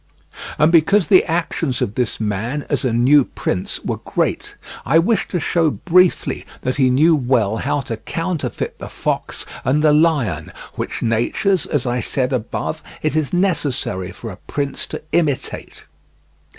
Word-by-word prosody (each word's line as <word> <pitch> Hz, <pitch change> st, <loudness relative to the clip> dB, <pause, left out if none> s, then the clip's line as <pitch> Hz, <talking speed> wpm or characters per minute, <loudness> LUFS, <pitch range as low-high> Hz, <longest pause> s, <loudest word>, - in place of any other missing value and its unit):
And 150 Hz, +2 st, +4 dB
because 170 Hz, +2 st, +4 dB
the 185 Hz, -, +7 dB
actions 165 Hz, -5 st, -1 dB
of 100 Hz, -, -1 dB
this 125 Hz, 0 st, -2 dB
man, 110 Hz, +7 st, -2 dB
as -, -, 0 dB
a 130 Hz, -, +1 dB
new 130 Hz, +5 st, +5 dB
prince, 90 Hz, -6 st, -3 dB
were -, -, -1 dB
great, -, -, -2 dB, 0.3 s
I 150 Hz, -, +3 dB
wish 195 Hz, +7 st, +2 dB
to 180 Hz, -, -2 dB
show 165 Hz, +1 st, +2 dB
briefly 180 Hz, +4 st, +2 dB, 0.2 s
that 130 Hz, +2 st, -2 dB
he 130 Hz, -2 st, +4 dB
knew 155 Hz, +6 st, +4 dB
well 120 Hz, -6 st, +1 dB
how 145 Hz, -, -1 dB
to 115 Hz, -3 st, -5 dB
counterfeit 165 Hz, +5 st, -4 dB
the -, -, -7 dB
fox -, -, -2 dB, 0.2 s
and 150 Hz, +4 st, +1 dB
the 150 Hz, -1 st, +5 dB
lion, 140 Hz, -, +1 dB, 0.2 s
which -, -, -4 dB
natures, 120 Hz, -, +1 dB
as 145 Hz, -4 st, -1 dB
I 120 Hz, 0 st, 0 dB
said 130 Hz, +3 st, -1 dB
above, 130 Hz, +6 st, -3 dB, 0.2 s
it 155 Hz, 0 st, 0 dB
is 155 Hz, -3 st, 0 dB
necessary 145 Hz, -, 0 dB
for 110 Hz, +4 st, -8 dB
a 90 Hz, -, -10 dB
prince 140 Hz, -1 st, -2 dB
to -, -, -6 dB
imitate. 150 Hz, -6 st, -2 dB
145 Hz, 160 wpm, -19 LUFS, 120-165 Hz, 0.3 s, the